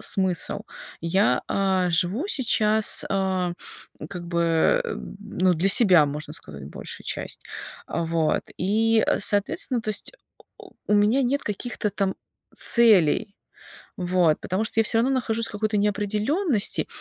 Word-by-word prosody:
смысл?" 190 Hz, -3 st, -2 dB, 0.4 s
Я, 190 Hz, +5 st, +1 dB
а, 190 Hz, -2 st, 0 dB
живу 180 Hz, -, -1 dB
сейчас, 220 Hz, -, +2 dB
а, 190 Hz, -2 st, -1 dB, 0.6 s
как 180 Hz, -3 st, -7 dB
бы, 170 Hz, -, +1 dB, 0.4 s
ну, 185 Hz, -3 st, -1 dB
для 175 Hz, +4 st, 0 dB
себя, 185 Hz, -6 st, +7 dB
можно 150 Hz, +1 st, -7 dB
сказать, 75 Hz, -, -7 dB
большую 70 Hz, -, -8 dB
часть. -, -, -4 dB, 0.5 s
Вот 165 Hz, -1 st, -1 dB, 0.2 s
и, 220 Hz, +4 st, +1 dB
соответственно, 235 Hz, -, +1 dB
то 215 Hz, -, -4 dB
есть 205 Hz, -1 st, -4 dB, 0.3 s
у -, -, -22 dB, 0.2 s
у -, -, -20 dB, 0.2 s
у 210 Hz, -, +2 dB
меня 210 Hz, +6 st, +2 dB
нет 270 Hz, +3 st, -1 dB
каких-то 210 Hz, +1 st, -4 dB
там 195 Hz, -1 st, -2 dB, 0.4 s
целей, 210 Hz, -3 st, +4 dB, 0.6 s
вот. 180 Hz, -4 st, 0 dB
Потому 190 Hz, +4 st, -3 dB
что 225 Hz, -, -1 dB
я -, -, +1 dB
всё 225 Hz, -, +4 dB
равно 245 Hz, +4 st, +1 dB
нахожусь 230 Hz, -3 st, -1 dB
в -, -, -12 dB
какой-то 215 Hz, +1 st, -2 dB
неопределенности. 210 Hz, -, 0 dB
200 Hz, 135 wpm, -23 LUFS, 180-225 Hz, 0.6 s, себя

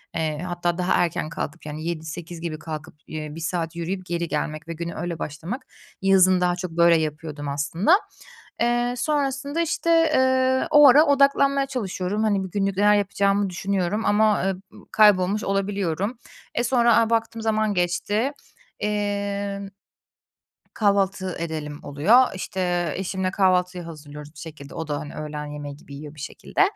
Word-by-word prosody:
eee, 155 Hz, -2 st, -1 dB
hatta 175 Hz, 0 st, -1 dB
daha 180 Hz, 0 st, +1 dB
erken 170 Hz, -3 st, 0 dB
kalkıp 165 Hz, 0 st, -6 dB
yani 155 Hz, +1 st, -6 dB
7.00-8.00 165 Hz, +1 st, -5 dB
gibi 160 Hz, -2 st, -4 dB
kalkıp, 155 Hz, 0 st, -7 dB
eee, 155 Hz, -1 st, -5 dB
1 -, -, -7 dB
saat 165 Hz, 0 st, -2 dB
yürüyüp 180 Hz, +2 st, -4 dB
geri 170 Hz, -1 st, -2 dB
gelmek 155 Hz, +1 st, -3 dB
ve 165 Hz, -, -4 dB
güne 170 Hz, +1 st, -5 dB
öyle 170 Hz, -1 st, -4 dB
başlamak... 165 Hz, -, -5 dB, 0.4 s
Yazın 185 Hz, -1 st, +5 dB
daha 175 Hz, 0 st, +2 dB
çok 180 Hz, -1 st, -5 dB
böyle 170 Hz, 0 st, +5 dB
yapıyordum 150 Hz, -1 st, -5 dB
aslında. 165 Hz, -, +2 dB, 0.6 s
Eee, 240 Hz, +1 st, +2 dB
sonrasında, 285 Hz, +2 st, -1 dB
işte, 335 Hz, +1 st, -1 dB, 0.3 s
eee, 260 Hz, 0 st, +3 dB
o 295 Hz, -1 st, +8 dB
ara 295 Hz, +5 st, +7 dB
odaklanmaya 275 Hz, -1 st, +3 dB
çalışıyorum. 210 Hz, -5 st, -2 dB
Hani, 200 Hz, -3 st, +1 dB
bugünlük 195 Hz, +1 st, -2 dB
neler 210 Hz, +1 st, +5 dB
yapacağımı 200 Hz, 0 st, +1 dB
düşünüyorum 195 Hz, +3 st, -1 dB
ama, 210 Hz, -1 st, +3 dB
eee, 195 Hz, -, +1 dB, 0.2 s
ııı, -, -, -15 dB
kaybolmuş 205 Hz, -1 st, +4 dB
olabiliyorum. 195 Hz, +1 st, -1 dB, 0.4 s
Eee, 240 Hz, -, +2 dB
sonra, 235 Hz, -2 st, +4 dB
a, 230 Hz, -1 st, +3 dB
baktım 230 Hz, 0 st, 0 dB
zaman 215 Hz, -1 st, +1 dB
geçti. 205 Hz, +8 st, 0 dB, 0.5 s
İmm 200 Hz, -1 st, -2 dB, 1.0 s
"Kahvaltı 195 Hz, -3 st, +1 dB
edelim." 155 Hz, -3 st, -4 dB
oluyor. 190 Hz, -, +4 dB
İşte, 175 Hz, -3 st, -1 dB
eşimle 190 Hz, 0 st, -2 dB
kahvaltıyı 180 Hz, -2 st, +1 dB
hazırlıyoruz 150 Hz, -2 st, -10 dB
bir -, -, -12 dB
şekilde. 150 Hz, -3 st, -10 dB
O 160 Hz, -, -4 dB
da, 145 Hz, -1 st, -2 dB
hani, 150 Hz, -1 st, -8 dB
öğlen 150 Hz, -1 st, -5 dB
yemeği 145 Hz, -1 st, -7 dB
gibi 140 Hz, -2 st, -12 dB
yiyor 150 Hz, +1 st, -9 dB
bir -, -, -13 dB
şekilde. 155 Hz, -, -3 dB
185 Hz, 150 wpm, -24 LUFS, 160-210 Hz, 1.0 s, o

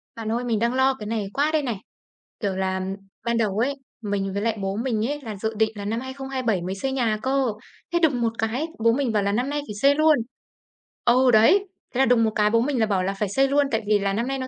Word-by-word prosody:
Bạn 225 Hz, -1 st, -4 dB
ơi, 240 Hz, +2 st, -1 dB
mình 230 Hz, -4 st, 0 dB
đang 235 Hz, +1 st, +1 dB
lo 265 Hz, +1 st, +3 dB
cái 215 Hz, -5 st, -8 dB
này 215 Hz, -3 st, -2 dB
quá 290 Hz, +3 st, +1 dB
đây 310 Hz, -1 st, +2 dB
này! 240 Hz, -6 st, -2 dB, 0.6 s
Kiểu 200 Hz, -5 st, -1 dB
là 190 Hz, 0 st, -1 dB, 0.4 s
ban 235 Hz, 0 st, +1 dB
đầu 210 Hz, -4 st, 0 dB
ấy, 270 Hz, +5 st, +1 dB, 0.3 s
mình 200 Hz, -2 st, -2 dB
với 200 Hz, -, -2 dB
lại 225 Hz, 0 st, 0 dB
bố 195 Hz, 0 st, -2 dB
mình 230 Hz, -2 st, -1 dB
ấy 290 Hz, +2 st, -3 dB
là 220 Hz, -5 st, -6 dB
dự 220 Hz, +3 st, -3 dB
định 220 Hz, 0 st, +2 dB
là 200 Hz, -1 st, -6 dB
năm 225 Hz, +3 st, -1 dB
2027 260 Hz, -6 st, -2 dB
mới 185 Hz, +2 st, -4 dB
xây 265 Hz, +7 st, -2 dB
nhà 235 Hz, -5 st, 0 dB
cơ, 270 Hz, 0 st, +1 dB, 0.5 s
thế 345 Hz, -, +3 dB
đùng 285 Hz, -8 st, +2 dB
một 230 Hz, -1 st, +1 dB
cái 235 Hz, +8 st, -1 dB, 0.2 s
bố 230 Hz, -, +6 dB
mình 265 Hz, -1 st, 0 dB
bảo 210 Hz, -2 st, +1 dB
là 200 Hz, -, +1 dB
năm 245 Hz, +6 st, 0 dB
nay 295 Hz, +1 st, -1 dB
phải 210 Hz, -, -6 dB
xây 280 Hz, +1 st, +5 dB
luôn. 310 Hz, 0 st, +5 dB, 0.9 s
Ờ, 240 Hz, -, +4 dB, 0.2 s
đấy. 300 Hz, -, +5 dB, 0.3 s
Thế -, -, 0 dB
là 270 Hz, -, +5 dB
đùng 235 Hz, -2 st, +4 dB
một 220 Hz, -, +2 dB
cái 210 Hz, 0 st, +3 dB
bố 230 Hz, +1 st, +3 dB
mình 265 Hz, 0 st, 0 dB
là 220 Hz, -, +4 dB
bảo 195 Hz, -3 st, 0 dB
là 195 Hz, +1 st, -1 dB
phải 210 Hz, -, 0 dB
xây 270 Hz, +7 st, +2 dB
luôn 285 Hz, +1 st, +3 dB
tại 225 Hz, -, +1 dB
vì 210 Hz, -1 st, +3 dB
là 195 Hz, 0 st, 0 dB
năm 230 Hz, +4 st, -1 dB
nay 270 Hz, 0 st, -2 dB
nó 260 Hz, -, -4 dB
230 Hz, 270 wpm, -24 LUFS, 210-265 Hz, 0.9 s, bố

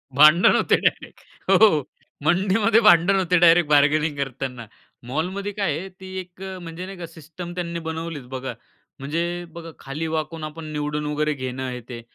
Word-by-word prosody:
भांडण 155 Hz, +5 st, +7 dB
होते -, -, +3 dB
डायरेक्ट. -, -, -2 dB, 0.3 s
हो, 200 Hz, -10 st, +5 dB, 0.4 s
मंडीमध्ये 195 Hz, +6 st, +3 dB
भांडण 195 Hz, -2 st, +6 dB
होते 180 Hz, -2 st, +2 dB
डायरेक्ट 170 Hz, -2 st, +5 dB
बार्गेनिंग 150 Hz, +1 st, +3 dB
करतांना. 130 Hz, -3 st, -4 dB, 0.4 s
मॉलमध्ये 185 Hz, +9 st, -3 dB
काय 195 Hz, -8 st, -1 dB
आहे 190 Hz, +4 st, -6 dB
ती 190 Hz, -, -10 dB
एक 180 Hz, 0 st, -11 dB
अ, 190 Hz, -1 st, -6 dB
म्हणजे 170 Hz, +1 st, -7 dB
नाही 195 Hz, 0 st, -9 dB
का 175 Hz, -, -6 dB
सिस्टम 165 Hz, +2 st, -9 dB
त्यांनी 170 Hz, -1 st, -3 dB
बनवलीच 160 Hz, -4 st, -5 dB
बघा, 130 Hz, -1 st, -5 dB, 0.5 s
म्हणजे 150 Hz, +5 st, -2 dB, 0.3 s
बघा, 165 Hz, 0 st, -9 dB
खाली 150 Hz, +4 st, -5 dB
वाकून 160 Hz, 0 st, -3 dB
आपण 155 Hz, +1 st, -7 dB
निवडून 150 Hz, 0 st, -3 dB
वगैरे 150 Hz, +1 st, 0 dB
घेणं 130 Hz, -1 st, -5 dB
आहे 125 Hz, -1 st, -4 dB
ते. 120 Hz, -2 st, -7 dB
160 Hz, 165 wpm, -23 LUFS, 145-180 Hz, 0.5 s, भांडण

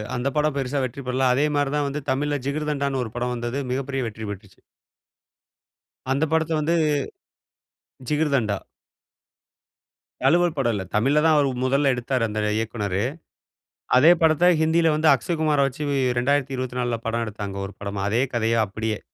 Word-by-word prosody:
அந்த 125 Hz, +2 st, -2 dB
படம் 150 Hz, -1 st, +1 dB
பெருசா 135 Hz, +1 st, -1 dB
வெற்றி 130 Hz, +3 st, -7 dB
பெறல. 130 Hz, +1 st, +1 dB
அதே 140 Hz, +4 st, +2 dB
மாரிதான் 145 Hz, 0 st, 0 dB
வந்து 145 Hz, +2 st, -4 dB
தமிழ்ல, 145 Hz, +2 st, 0 dB
ஜிகர்தண்டான்னு 140 Hz, -2 st, -1 dB
ஒரு 110 Hz, -, -7 dB
படம் 125 Hz, 0 st, -1 dB
வந்தது. 120 Hz, +2 st, -3 dB
மிகப்பெரிய 135 Hz, 0 st, -2 dB
வெற்றி 110 Hz, 0 st, -7 dB
பெற்றுச்சு. 100 Hz, -1 st, -9 dB, 1.5 s
அந்த 140 Hz, +4 st, +1 dB
படத்த 160 Hz, 0 st, +1 dB
வந்து 165 Hz, +3 st, +1 dB, 1.3 s
ஜிகிர்தண்டா. 140 Hz, -9 st, +1 dB, 1.6 s
தழுவல் 170 Hz, +4 st, +3 dB
படம் 120 Hz, -4 st, +1 dB
இல்ல. 100 Hz, -, -3 dB
தமிழ்ல 135 Hz, +8 st, +3 dB
தான் 160 Hz, -1 st, +5 dB
அவர் 140 Hz, -1 st, +3 dB, 0.2 s
முதல்ல 135 Hz, +1 st, +2 dB
எடுத்தாரு 125 Hz, 0 st, -1 dB
அந்த 105 Hz, 0 st, -4 dB, 0.2 s
இயக்குனரு. 105 Hz, -3 st, -2 dB, 0.9 s
அதே 155 Hz, +6 st, +7 dB
படத்த 160 Hz, +2 st, +4 dB
ஹிந்தியில 160 Hz, 0 st, +3 dB
வந்து 155 Hz, +1 st, +3 dB
அக்ஷய்குமார 155 Hz, +2 st, 0 dB
வச்சு 135 Hz, +3 st, -6 dB, 0.4 s
2024ல 125 Hz, -3 st, -1 dB
படம் 115 Hz, +1 st, -1 dB
எடுத்தாங்க 100 Hz, -2 st, -6 dB
ஒரு 95 Hz, -, -9 dB
படமா. 100 Hz, 0 st, -4 dB
அதே 120 Hz, +4 st, +2 dB
கதைய 115 Hz, 0 st, +1 dB
அப்படியே. 110 Hz, +1 st, -3 dB
135 Hz, 140 wpm, -23 LUFS, 115-150 Hz, 1.6 s, அதே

